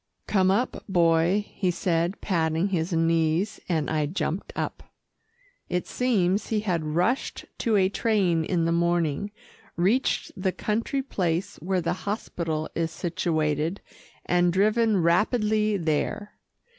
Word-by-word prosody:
"Come 190 -2 +2
up, 210 +7 0
Boy," 175 +2 +3
he 185 - -2
said 175 +1 0
patting 165 0 0
his 175 -1 -1
knees, 165 +3 +1
and 160 -4 0
I 155 -2 0
jumped 180 +2 -3
up. - - -3 0.9
It 180 0 -1
seems 205 -6 +1
he 215 -2 0
had 180 -6 -1
rushed 225 +10 0
to 230 -3 +1
a 190 -2 +4
train 190 -5 +1
in 170 0 0
the 165 - +1
morning, 170 +1 +1 0.5
reached 200 +10 +1
the 190 0 0
country 230 +6 -1
place 180 -7 -2
where 185 +3 -1
the 170 - 0 0.2
hospital 165 -7 -3
is 165 -1 -1
situated, 160 0 -1 0.5
and 175 0 +3
driven 210 +1 +2
rapidly 210 +4 +2
there. 165 +5 -1
180 Hz, 130 wpm, -26 LUFS, 165-205 Hz, 0.9 s, a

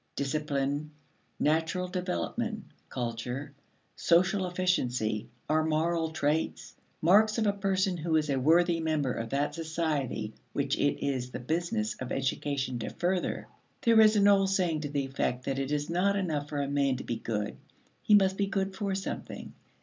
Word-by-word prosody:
Discipline, 145 0 -1 0.5
natural 165 +4 +1
development, 195 +5 -3 0.3
culture, 125 +3 -4 0.4
social 185 +2 +3
efficiency, 125 - 0 0.2
are 155 +1 +2
moral 160 +1 +1
traits 155 0 -1 0.3
marks 215 +6 +5
of 225 - +1
a 205 - +3
person 190 -2 0
who 160 0 0
is 155 -1 +2
a 135 -2 +1
worthy 170 +4 +4
member 155 -5 0
of 115 0 -4
that 140 +3 0
society 160 -4 -2 0.2
which - - 0
it - - 0
is 130 -3 -1
the 125 - -6
business 125 -6 -1
of 130 - -5
education 135 -1 -1
to - - -3
further. 180 +1 -1 0.4
There 230 -1 +6
is 215 0 +6
an 205 -1 +5
old 195 -1 +5
saying 180 -5 +1
to 145 - -4
the 140 -1 -1
effect 130 -2 -2
that 135 0 -1
it 135 +1 -2
is 145 0 0
not 185 +4 +2
enough 155 -7 -1
for 145 - -2
a - - -2
man 140 -1 +1
to - - -6
be 115 - -3
good; 105 -2 -3 0.4
he 210 - +5
must 190 -1 +4
be 200 - +1
good 195 0 -1
for 200 -1 -1
something. 195 - -5
160 Hz, 165 wpm, -29 LUFS, 140-185 Hz, 0.5 s, There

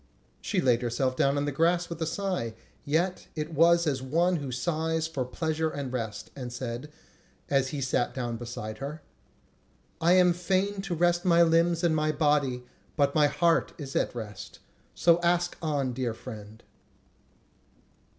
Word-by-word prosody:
She - - 0
laid 125 -2 +3
herself 130 +2 0
down 140 +2 +2
on 145 - 0
the 145 - -1
grass 170 +4 +2
with 170 -1 -7
a 160 - 0
sigh, 175 - -2 0.3
yet 170 +5 0
it 155 +1 -4
was 170 +2 +5
as 140 -4 0
of 130 0 -9
one 175 +3 +3
who 140 -4 -5
sighs 160 +4 -1
for 140 -5 -2
pleasure 160 +5 -1
and 140 -4 -5
rest, 110 -4 -4
and 125 -3 -6
said, 120 +3 -5 0.6
as 135 -1 +3
he 140 +1 -4
sat 130 -2 0
down 120 -3 -3
beside 110 -2 -6
her: 145 +3 -6 1.0
"I 170 +2 +5
am 180 -1 +5
fain 190 +3 0
to 195 -3 -3
rest 175 +1 +2
my 170 -2 +5
limbs 165 +1 +3
and 165 -2 +3
my 155 0 +1
body, 145 -5 +1 0.3
but 140 -1 +3
my 150 -1 +5
heart 170 +2 +2
is 140 -3 -7
at - - 0
rest; 110 -3 -7 0.4
so 170 0 +4
ask 175 0 +1
on, 145 -5 -1
dear 120 -2 -2
friend." 110 -2 -10
150 Hz, 170 wpm, -28 LUFS, 130-170 Hz, 1.0 s, was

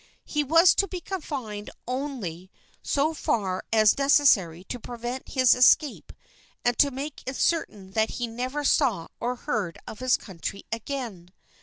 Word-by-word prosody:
He 300 -1 0
was 330 +5 +6
to 395 - +1
be 370 - -5
confined 270 - -5 0.2
only 245 - -4 0.3
so 295 +3 +1
far 195 -10 -1
as 215 +2 +4
necessary 225 - +4
to 245 +5 -6
prevent 240 +2 -6
his 255 -2 +5
escape 255 +3 +3 0.5
and 245 0 +3
to 285 - +6
make 275 +2 -6
it 260 - -3
certain 210 - -1
that 220 +2 +1
he 240 - -3
never 255 +5 -4
saw 240 - +2
or 245 +1 -1
heard 215 - -3
of 215 - -9
his 255 0 +3
country 195 0 -7
again. 225 -6 -5
250 Hz, 150 wpm, -26 LUFS, 210-280 Hz, 0.5 s, was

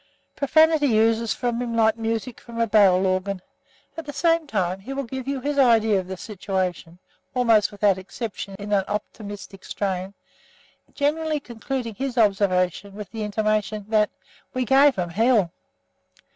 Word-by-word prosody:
Profanity 295 -4 +4
oozes 225 +1 +2
from 240 -1 -2
him 235 -2 -3
like 220 -1 +4
music 225 +1 -3
from 235 -1 -8
a 230 - +3
barrel 195 -4 +4
organ. 185 +1 0 0.6
At 325 -2 -7
the 290 - -5
same 330 -1 +2
time, 185 -6 -1
he 255 +8 -7
will 275 0 -2
give 260 +1 -6
you 275 -1 -1
his 285 +2 -1
idea 225 -5 +4
of 185 - -6
the 190 0 -6
situation, 185 -4 -3 0.4
almost 230 -4 +3
without 200 -2 +2
exception 200 0 -6
in 205 +1 -7
an 195 -1 +3
optimistic 205 -1 -6
strain, 190 -1 -3 0.8
generally 305 +1 0
concluding 245 -1 -5
his 260 +3 -4
observation 195 -2 +1
with 210 -3 -8
the 225 - -5
intimation 215 0 -1
that 215 -1 +3 0.5
"We 255 0 0
gave 270 +1 +5
them 175 -2 -3
hell." 220 -3 +3
220 Hz, 155 wpm, -24 LUFS, 195-255 Hz, 0.8 s, gave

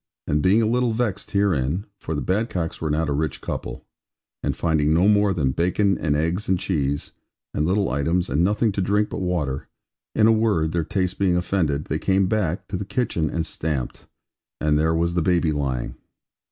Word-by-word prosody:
And 75 +1 +1
being 100 +8 +4
a - - +2
little 120 +1 +1
vexed 110 -4 -2
herein 90 -3 +1
(for 80 - -4
the 75 - -2
Badcocks 95 -4 -1
were 80 - -1
not 80 +2 0
a 75 - 0
rich 75 0 -1
couple) - - -5 0.6
and - - -2
finding 80 -2 +2
no 90 +4 +4
more 105 -1 +4
than 75 -8 +1
bacon, 90 +6 +1
and 75 -3 +1
eggs, 85 +7 -1
and 95 - +3
cheese, 70 -6 -1 0.4
and 75 - 0
little 100 +2 +2
items, 85 +7 0
and 80 +4 +1
nothing 105 +4 +2
to 100 - -2
drink 105 +3 +1
but - - -4
water; 85 -7 -2 0.5
in 110 - +4
a 110 - +6
word, 105 -8 +2
their 85 0 0
taste 90 +2 -2
being 95 -3 +3
offended, 85 -5 0
they 80 - -2
came 95 +2 +2
back, 95 -3 -1
to 100 - -2
the 100 - -3
kitchen, 100 - -1
and 80 +2 -2
stamped; 75 -4 -4 0.5
and 75 -1 +2
there 80 +1 +2
was 85 +1 +1
the 85 - +1
baby 85 -1 +2
lying. 70 -4 -2
85 Hz, 195 wpm, -23 LUFS, 75-100 Hz, 0.6 s, a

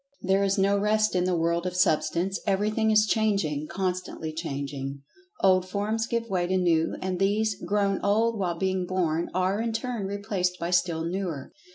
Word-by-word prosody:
There 195 +1 +2
is 195 0 +1
no 200 +1 +3
rest 215 +1 +2
in 180 0 +2
the 180 -1 +1
world 170 +2 0
of 180 - -4
Substance. 180 +1 +1
Everything 215 +3 +1
is 215 0 +5
changing—constantly 180 -4 -1
changing. 140 -3 -5 0.4
Old 185 -1 +4
forms 215 +3 -1
give 235 0 -2
way 180 -4 0
to 185 +1 +1
new, 170 -3 +2
and 185 -1 -2
these, 210 +2 +2
grown 200 -1 +1
old 220 +2 +2
while 175 -3 -1
being 185 0 -1
born, 170 -3 0
are, 185 +3 +1
in 230 -1 -2
turn 225 -3 -3
replaced 195 -3 -2
by 170 0 -3
still 175 -2 +1
newer. 170 -6 -4
185 Hz, 170 wpm, -26 LUFS, 175-205 Hz, 0.4 s, is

